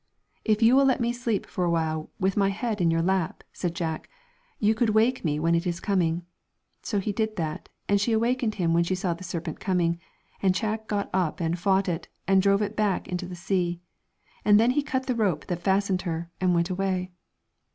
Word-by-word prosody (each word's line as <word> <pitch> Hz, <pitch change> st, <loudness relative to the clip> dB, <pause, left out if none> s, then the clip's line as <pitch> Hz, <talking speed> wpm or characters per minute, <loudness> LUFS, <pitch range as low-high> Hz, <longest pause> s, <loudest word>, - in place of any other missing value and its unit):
' -, -, -47 dB
If 215 Hz, 0 st, +2 dB
you 235 Hz, +3 st, +6 dB
will 275 Hz, 0 st, +6 dB
let 265 Hz, 0 st, +3 dB
me 235 Hz, 0 st, +1 dB
sleep 235 Hz, -4 st, -1 dB
for 180 Hz, -, -3 dB
awhile 160 Hz, -2 st, 0 dB
with 190 Hz, 0 st, +1 dB
my 195 Hz, -1 st, +3 dB
head 210 Hz, 0 st, -2 dB
in 170 Hz, -, +4 dB
your 165 Hz, 0 st, +2 dB
lap,' 185 Hz, -2 st, 0 dB
said 175 Hz, -2 st, -3 dB
Jack, 160 Hz, -2 st, -3 dB, 0.5 s
'you 215 Hz, +1 st, +3 dB
could 220 Hz, -1 st, +1 dB
wake 240 Hz, +4 st, +3 dB
me 150 Hz, -3 st, 0 dB
when 165 Hz, +2 st, +2 dB
it 170 Hz, +2 st, +1 dB
is 170 Hz, -1 st, -2 dB
coming.' 175 Hz, -4 st, 0 dB, 0.6 s
So 210 Hz, -, -2 dB
he 200 Hz, +2 st, 0 dB
did 220 Hz, +1 st, -1 dB
that, 155 Hz, -4 st, -4 dB, 0.2 s
and 200 Hz, 0 st, +3 dB
she 230 Hz, -, +1 dB
awakened 230 Hz, 0 st, +1 dB
him 170 Hz, -4 st, +1 dB
when 170 Hz, +1 st, +4 dB
she 185 Hz, +2 st, 0 dB
saw 185 Hz, -2 st, -1 dB
the 170 Hz, +3 st, -10 dB
serpent 170 Hz, -3 st, -5 dB
coming, 170 Hz, -3 st, +1 dB, 0.4 s
and 190 Hz, -2 st, +3 dB
Jack 220 Hz, +1 st, -2 dB
got 205 Hz, -1 st, -2 dB
up 185 Hz, -2 st, 0 dB
and 170 Hz, +1 st, -1 dB
fought 195 Hz, +2 st, +2 dB
with 170 Hz, -2 st, +1 dB
it, -, -, -17 dB, 0.2 s
and 195 Hz, 0 st, +5 dB
drove 200 Hz, +1 st, +3 dB
it 205 Hz, +1 st, -4 dB
back 210 Hz, -3 st, 0 dB
into 180 Hz, 0 st, -3 dB
the 180 Hz, -, -7 dB
sea. 175 Hz, -1 st, -1 dB, 0.6 s
And 210 Hz, 0 st, +6 dB
then 235 Hz, +3 st, +4 dB
he 295 Hz, +3 st, +2 dB
cut 265 Hz, -2 st, -2 dB
the 255 Hz, -, 0 dB
rope 200 Hz, -10 st, 0 dB
that 175 Hz, -2 st, -3 dB
fastened 190 Hz, 0 st, +1 dB
her, 170 Hz, -1 st, -4 dB
and 185 Hz, -, +3 dB
he 175 Hz, -, +3 dB
went 170 Hz, +2 st, +1 dB
away. 185 Hz, -1 st, -1 dB
190 Hz, 225 wpm, -26 LUFS, 170-215 Hz, 0.6 s, you